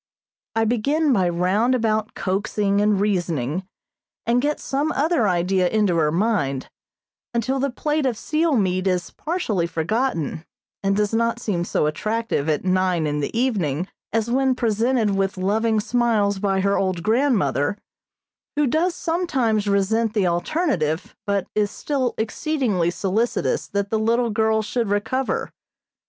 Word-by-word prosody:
I 225 0 +2
begin 280 +7 +2
by 185 -5 +2
round 190 +9 +2
about 220 -2 0
coaxing 200 +1 0
and 210 -1 +2
reasoning, 175 -5 -1 0.6
and 240 +1 +2
get 295 +2 0
some 285 +3 -1
other 295 -5 +2
idea 180 0 +2
into 210 -5 +2
her 150 -2 +2
mind, 170 - 0 0.6
until 260 +4 0
the 275 +1 +1
plate 295 +3 -1
of 240 -4 -1
seal 310 +4 +1
meat 185 -3 +1
is 180 -2 0
partially 260 - -1
forgotten, 170 - -1 0.4
and 195 -1 +1
does 210 0 0
not 230 +1 +1
seem 190 -7 -1
so 160 - 0
attractive 215 0 -1
at 155 +3 0
nine 185 -3 +1
in 150 0 -1
the 145 +10 -3
evening 185 - 0 0.2
as 225 0 0
when 265 0 +2
presented 230 -1 +1
with 195 -1 0
loving 215 +4 +1
smiles 210 -3 +1
by 195 -1 +1
her 200 +1 +2
old 185 -3 -1
grandmother, 210 - +1 0.8
who 295 0 +2
does 330 +7 +1
sometimes 265 - 0
resent 215 +3 +1
the 205 -3 +2
alternative, 175 - -1
but 200 -2 0
is 210 -1 +1
still 260 +1 -2
exceedingly 220 - 0
solicitous 195 +7 -1
that 200 0 -2
the 220 - +1
little 230 +2 +1
girl 220 0 +2
should 230 +1 -1
recover. 225 +6 -1
215 Hz, 145 wpm, -22 LUFS, 185-245 Hz, 0.8 s, I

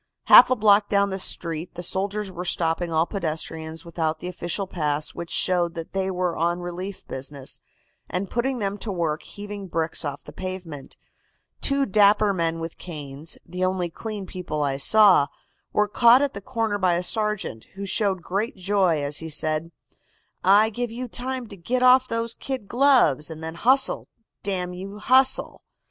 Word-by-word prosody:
"Half - - +9
a 255 - +3
block 205 -2 +4
down 200 -1 +2
the 190 - -3
street 170 -2 -2
the 175 - -5
soldiers 200 +2 -1
were 180 0 -6
stopping 170 -1 0
all 160 +1 +2
pedestrians 160 -2 -5
without 160 -2 -2
the 180 - -7
official 180 +2 -3
pass 150 -4 -2
which 170 -1 -7
showed 175 -2 0
that 165 -1 -7
they 190 0 -1
were 180 -2 -1
on 170 +2 0
relief 180 +2 -6
business, 135 0 -6 0.5
and 185 +2 -2
putting 250 +5 -1
them 200 -2 -3
to 215 - -4
work 165 -4 -1
heaving 205 -1 -8
bricks 165 -2 -2
off 145 -1 -5
the 150 - -12
pavement. 180 -5 -7 0.6
Two 275 0 +3
dapper 205 0 +4
men 165 -2 -1
with 165 0 -7
canes, 150 -2 -6
the 180 +2 -4
only 185 -2 -1
clean 210 +2 -6
people 175 -5 -4
I 135 -1 0
saw, 190 -1 +6 0.4
were 210 0 +2
caught 235 +5 +5
at 285 - -1
the 200 - -7
corner 225 -3 -2
by 180 -2 +2
a 175 - -1
sergeant, 210 - -2
who 200 +1 -5
showed 195 -2 0
great 200 +5 -2
joy 185 -5 +1
as 145 +1 -1
he 160 - -6
said: 155 +2 -1 0.7
"'I 205 +4 +5
give 240 +2 -3
you 245 +3 -5
time 255 +1 -4
to 200 - -8
git 245 +8 -1
off 255 0 +6
those 230 0 -2
kid 260 -7 -5
gloves, 245 - +3
and 160 0 -8
then 160 0 -5
hustle, 260 +9 +2 0.3
damn 180 -3 -2
you, 195 +3 -8
hustle! 260 +4 +2
185 Hz, 175 wpm, -24 LUFS, 165-210 Hz, 0.7 s, Half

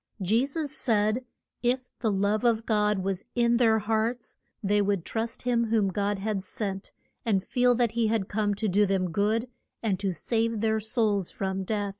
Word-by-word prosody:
Je 220 +8 +2
sus 295 0 -3
said 220 -3 +1 0.4
if 250 +1 0
the 225 -3 +1
love 200 +2 +1
of 230 -2 +2
God 210 -3 +1
was 195 0 -2
in 235 -1 +3
their 225 -2 +4
hearts 220 +3 -1 0.3
they 205 +1 +3
would 200 -4 0
trust 225 0 -3
him 240 -2 +2
whom 215 -3 +2
God 200 +2 -1
had 200 0 -2
sent, 195 0 -3 0.3
and 200 -5 +1
feel 245 +1 +3
that 240 -2 +2
he 230 -1 +1
had 215 -3 0
come 205 -1 0
to 215 +2 -2
do 205 +2 +3
them 185 -2 0
good, 215 +6 +1 0.4
and 200 -5 0
to 195 -1 0
save 225 +4 -1
their 220 0 +1
souls 215 -4 +1
from 190 0 -3
death. 205 +1 -1
215 Hz, 185 wpm, -27 LUFS, 200-230 Hz, 0.4 s, their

